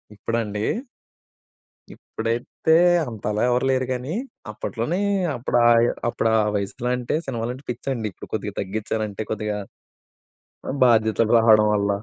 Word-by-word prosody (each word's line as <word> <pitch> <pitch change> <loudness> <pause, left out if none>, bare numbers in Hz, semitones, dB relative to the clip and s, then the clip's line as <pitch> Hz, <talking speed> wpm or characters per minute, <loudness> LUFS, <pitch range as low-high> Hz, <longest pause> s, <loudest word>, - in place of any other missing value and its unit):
ఇప్పుడా 115 +3 -2
అండి? 105 +1 -4 1.3
ఇప్పుడైతే 115 +7 -2 0.3
అంతలా 105 -2 -3
ఎవరూ 125 +2 +1
లేరు 130 0 +1
గానీ 130 +6 -4 0.4
అప్పట్లోనీ 120 - -3 0.4
అప్పుడాయ 120 -1 +4 0.2
అప్పుడా 115 -2 0 0.2
వయసులో 100 +5 -3
అంటే 125 +4 -2
సినిమాలంటే 125 +1 -4
పిచ్చండి. 120 -2 -3
ఇప్పుడు - - -11
కొద్దిగా - - -3
తగ్గిచ్చానంటే 110 +1 -3
కొద్దిగా 105 -1 -2 1.1
ఆహ్, 140 - -2
బాధ్యతలు 110 -1 +3
రావడం 110 -2 +6
వల్ల. 100 0 +1
115 Hz, 110 wpm, -23 LUFS, 105-125 Hz, 1.3 s, రావడం